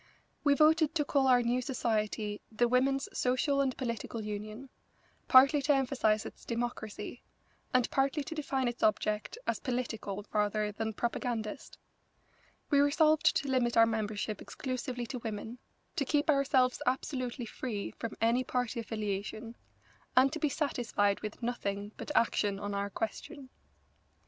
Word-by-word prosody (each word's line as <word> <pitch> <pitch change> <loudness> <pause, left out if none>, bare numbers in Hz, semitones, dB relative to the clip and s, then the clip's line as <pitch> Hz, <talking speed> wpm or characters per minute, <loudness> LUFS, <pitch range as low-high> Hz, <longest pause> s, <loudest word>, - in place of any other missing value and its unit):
We 285 -1 +4
voted 315 +1 +4
to 295 -3 +2
call 275 -2 +2
our 250 -1 +5
new 245 +2 +1
society 215 -4 -1
the 240 +2 +2
Women's 270 +3 +2
Social 260 +3 +2
and 265 -2 0
Political 230 -2 -4
Union, 215 +5 -6 0.6
partly 275 +3 +7
to 290 +1 +3
emphasise 250 -5 +1
its - - -10
democracy, 235 -3 -4 0.5
and 255 -1 +3
partly 275 +2 +1
to 300 - -6
define 275 -4 -1
its 240 0 -4
object 215 - +1
as - - -1
political 225 -6 -3
rather 210 0 +1
than 220 +1 -3
propagandist. 235 +1 -3 0.9
We 285 - +5
resolved 305 +2 +4
to 280 - 0
limit 250 -3 +1
our 230 - +8
membership 215 -2 -2
exclusively 255 -1 -4
to 250 +2 -5
women, 225 +1 -6 0.4
to - - +2
keep 295 +3 +2
ourselves 265 -3 +2
absolutely 255 -1 -1
free 215 -2 -4
from 230 -2 -5
any 235 +3 +3
party 245 -2 -2
affiliation, 215 +1 -4 0.6
and 265 +2 +6
to 320 - -3
be 300 - +1
satisfied 235 -9 0
with 215 +2 -7
nothing 205 -4 -3
but - - -7
action 205 -3 +2
on 205 0 -4
our 200 0 -1
question. 260 - -5
245 Hz, 145 wpm, -31 LUFS, 215-270 Hz, 0.9 s, our